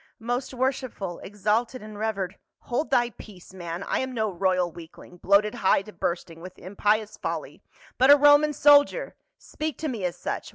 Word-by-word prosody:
" -, -, -55 dB
Most 255 Hz, +2 st, -3 dB
worshipful, 255 Hz, -8 st, -3 dB
exalted, 215 Hz, +5 st, -2 dB
and 215 Hz, 0 st, -10 dB
revered 205 Hz, -3 st, -3 dB
— -, -, -56 dB
" -, -, -64 dB
" -, -, -66 dB
Hold 270 Hz, +6 st, 0 dB
thy 240 Hz, -2 st, +2 dB
peace, 190 Hz, -5 st, -14 dB
man, 175 Hz, 0 st, -6 dB
I -, -, -1 dB
am 260 Hz, -1 st, -4 dB
no 220 Hz, -2 st, 0 dB
royal 185 Hz, -1 st, 0 dB
weakling, 170 Hz, +1 st, -13 dB
bloated 200 Hz, +4 st, +3 dB
nigh 190 Hz, 0 st, +2 dB
to 215 Hz, -, -13 dB
bursting 170 Hz, -1 st, -4 dB
with 185 Hz, +1 st, -10 dB
impious 210 Hz, +3 st, -1 dB
folly, -, -, -5 dB, 0.4 s
but 260 Hz, +2 st, +5 dB
a 290 Hz, -, +10 dB
Roman 290 Hz, +1 st, +5 dB
soldier; 290 Hz, -, +4 dB, 0.2 s
speak 310 Hz, -4 st, -5 dB
to 315 Hz, -, -3 dB
me 235 Hz, -8 st, -4 dB
as 180 Hz, -1 st, -2 dB
such. -, -, -4 dB
215 Hz, 195 wpm, -25 LUFS, 185-260 Hz, 0.4 s, a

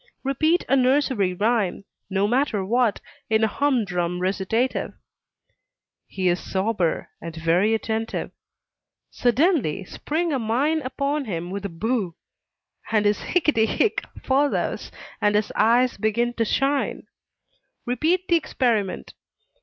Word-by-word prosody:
Repeat 310 Hz, +6 st, +1 dB
a 275 Hz, -, +3 dB
nursery 260 Hz, -6 st, +2 dB
rhyme, 205 Hz, -2 st, 0 dB, 0.2 s
no 195 Hz, +1 st, +1 dB
matter 240 Hz, -4 st, +1 dB
what, 235 Hz, +1 st, +1 dB, 0.3 s
in 220 Hz, 0 st, +3 dB
a -, -, +5 dB
humdrum 195 Hz, -10 st, 0 dB
recitative; 200 Hz, +7 st, -1 dB, 1.1 s
he 185 Hz, -1 st, -2 dB
is 175 Hz, 0 st, +2 dB
sober, 190 Hz, -3 st, -1 dB
and 165 Hz, -1 st, -7 dB
very 170 Hz, +7 st, +2 dB
attentive. 225 Hz, 0 st, -3 dB, 0.8 s
Suddenly 245 Hz, -, +1 dB
spring 320 Hz, -, -2 dB
a 270 Hz, -, 0 dB
mine 270 Hz, +8 st, +1 dB
upon 280 Hz, +2 st, -2 dB
him 175 Hz, -4 st, -4 dB
with 200 Hz, +1 st, -4 dB
a -, -, -2 dB
"Boo!" 195 Hz, 0 st, -2 dB, 0.7 s
His 210 Hz, -1 st, +2 dB
"Hicketty 300 Hz, -10 st, +2 dB
hick!" 435 Hz, -, +1 dB, 0.2 s
follows, 280 Hz, +2 st, 0 dB, 0.3 s
and 205 Hz, 0 st, +3 dB
his 210 Hz, 0 st, +1 dB
eyes 240 Hz, +3 st, +3 dB
begin 230 Hz, +4 st, 0 dB
to 230 Hz, -1 st, 0 dB
shine. 275 Hz, +5 st, 0 dB, 0.8 s
Repeat 320 Hz, +9 st, 0 dB
the 345 Hz, -, +4 dB
experiment. 230 Hz, -, -1 dB
225 Hz, 120 wpm, -24 LUFS, 200-270 Hz, 1.1 s, a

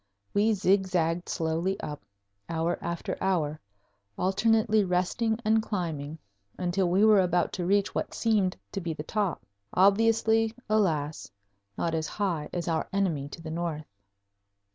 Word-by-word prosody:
We 215 Hz, +2 st, +3 dB
zigzagged 185 Hz, -3 st, +1 dB
slowly 170 Hz, +4 st, -1 dB
up, 150 Hz, -1 st, -6 dB, 0.5 s
hour 165 Hz, +1 st, -1 dB
after 170 Hz, 0 st, -3 dB
hour, 160 Hz, -6 st, 0 dB, 0.6 s
alternately 215 Hz, +3 st, +3 dB
resting 190 Hz, +5 st, 0 dB
and 220 Hz, +1 st, +4 dB
climbing, 160 Hz, -8 st, -3 dB, 0.4 s
until 180 Hz, 0 st, 0 dB
we 190 Hz, +4 st, +4 dB
were 215 Hz, -2 st, +6 dB
about 180 Hz, -2 st, +1 dB
to 175 Hz, -2 st, -2 dB
reach 200 Hz, +1 st, +2 dB
what -, -, -3 dB
seemed 210 Hz, -5 st, +1 dB
to 195 Hz, -, -3 dB
be 170 Hz, -2 st, -3 dB
the 150 Hz, -, -5 dB
top, 200 Hz, 0 st, -2 dB, 0.3 s
obviously, 225 Hz, +3 st, +3 dB
alas, 160 Hz, -9 st, 0 dB, 0.5 s
not 165 Hz, -, -1 dB
as 160 Hz, -1 st, -1 dB
high 175 Hz, -7 st, -2 dB
as 175 Hz, -1 st, -3 dB
our 165 Hz, -2 st, -1 dB
enemy 170 Hz, -8 st, 0 dB
to 165 Hz, -, -10 dB
the 160 Hz, -, -6 dB
north. 160 Hz, -2 st, -3 dB
180 Hz, 140 wpm, -28 LUFS, 165-205 Hz, 0.6 s, were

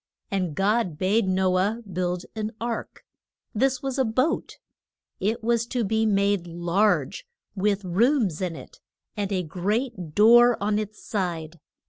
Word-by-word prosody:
And 185 Hz, -6 st, -1 dB
God 195 Hz, -4 st, +1 dB
bade 195 Hz, +4 st, +1 dB
No 185 Hz, 0 st, +2 dB
ah 210 Hz, +5 st, 0 dB
build 180 Hz, -3 st, -3 dB
an 215 Hz, +1 st, -3 dB
ark. 235 Hz, 0 st, -5 dB, 0.5 s
This 260 Hz, +3 st, +1 dB
was 270 Hz, 0 st, -2 dB
a -, -, +4 dB
boat. 255 Hz, +7 st, -1 dB, 0.6 s
It 220 Hz, +3 st, -1 dB
was 235 Hz, 0 st, +1 dB
to 245 Hz, -1 st, -1 dB
be 220 Hz, +2 st, +1 dB
made 200 Hz, -3 st, +1 dB
large, 175 Hz, -, 0 dB, 0.3 s
with 200 Hz, 0 st, 0 dB
rooms 205 Hz, -, +1 dB
in 180 Hz, -3 st, -2 dB
it, -, -, -12 dB, 0.4 s
and 205 Hz, -2 st, -3 dB
a 185 Hz, -2 st, 0 dB
great 185 Hz, -, -3 dB
door 240 Hz, +3 st, +7 dB
on 210 Hz, +1 st, 0 dB
its 215 Hz, 0 st, -7 dB
side. 170 Hz, -5 st, -3 dB
205 Hz, 145 wpm, -25 LUFS, 185-230 Hz, 0.6 s, door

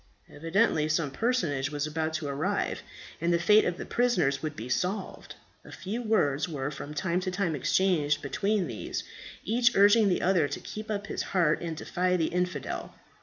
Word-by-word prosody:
Evidently 165 Hz, -1 st, +1 dB
some 155 Hz, -2 st, 0 dB
personage 155 Hz, -, 0 dB
was 145 Hz, 0 st, -2 dB
about 160 Hz, +1 st, -2 dB
to 160 Hz, -1 st, -3 dB
arrive, 140 Hz, 0 st, -1 dB, 0.4 s
and 170 Hz, +1 st, +1 dB
the 170 Hz, -, +4 dB
fate 210 Hz, +5 st, +5 dB
of 175 Hz, -, -1 dB
the -, -, -6 dB
prisoners 180 Hz, -, +1 dB
would 155 Hz, -1 st, -4 dB
be 115 Hz, -, -6 dB
solved. 185 Hz, +9 st, -3 dB, 0.3 s
A -, -, -13 dB
few 215 Hz, +6 st, -5 dB
words 160 Hz, -, +1 dB
were 145 Hz, -2 st, -3 dB
from 150 Hz, +1 st, -7 dB
time 175 Hz, +3 st, 0 dB
to 185 Hz, 0 st, -3 dB
time 185 Hz, -3 st, -1 dB
exchanged 150 Hz, -1 st, +2 dB
between 200 Hz, +7 st, 0 dB
these, 115 Hz, -8 st, -5 dB, 0.4 s
each 235 Hz, +3 st, +2 dB
urging 205 Hz, +2 st, +6 dB
the 180 Hz, -, 0 dB
other 175 Hz, -5 st, +3 dB
to -, -, -5 dB
keep 215 Hz, +1 st, -8 dB
up 205 Hz, -1 st, -2 dB
his -, -, -3 dB
heart 170 Hz, -5 st, +1 dB
and 165 Hz, -2 st, -4 dB
defy 180 Hz, +3 st, 0 dB
the 160 Hz, -2 st, 0 dB
infidel. 180 Hz, +1 st, -3 dB
175 Hz, 180 wpm, -28 LUFS, 150-200 Hz, 0.4 s, urging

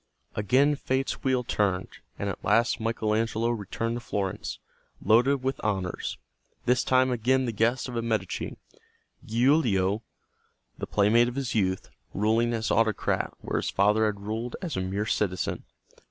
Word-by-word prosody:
Again 130 Hz, +8 st, +3 dB
Fate's 135 Hz, -1 st, -2 dB
wheel 130 Hz, -2 st, +2 dB
turned, 95 Hz, -5 st, 0 dB, 0.3 s
and -, -, -3 dB
at -, -, -5 dB
last 120 Hz, +1 st, +3 dB
Michael 110 Hz, -1 st, -1 dB
Angelo 115 Hz, +1 st, 0 dB
returned 115 Hz, +2 st, -3 dB
to -, -, -4 dB
Florence, 100 Hz, -5 st, -3 dB, 0.4 s
loaded 130 Hz, +4 st, +3 dB
with 135 Hz, 0 st, -2 dB
honors, 95 Hz, -4 st, -2 dB, 0.5 s
this 125 Hz, +1 st, +3 dB
time 130 Hz, 0 st, +3 dB
again 130 Hz, +2 st, +2 dB
the 120 Hz, -, -1 dB
guest 115 Hz, +5 st, +1 dB
of 125 Hz, -, -6 dB
a 115 Hz, -, 0 dB
Medici, 110 Hz, -5 st, -2 dB, 0.7 s
Giulio, 115 Hz, -5 st, +2 dB, 0.7 s
the -, -, -5 dB
playmate 110 Hz, +4 st, +4 dB
of 120 Hz, -, -4 dB
his 135 Hz, -3 st, -2 dB
youth, 95 Hz, -4 st, 0 dB, 0.2 s
ruling 110 Hz, +3 st, +2 dB
as 110 Hz, -1 st, -1 dB
autocrat 110 Hz, -2 st, +1 dB
where -, -, -2 dB
his -, -, -2 dB
father 105 Hz, +3 st, +3 dB
had 100 Hz, -2 st, -3 dB
ruled 110 Hz, +4 st, -4 dB
as 170 Hz, -6 st, -4 dB
a 95 Hz, -, -1 dB
mere 95 Hz, +3 st, -2 dB
citizen. 95 Hz, -5 st, -1 dB
115 Hz, 155 wpm, -27 LUFS, 105-125 Hz, 0.7 s, playmate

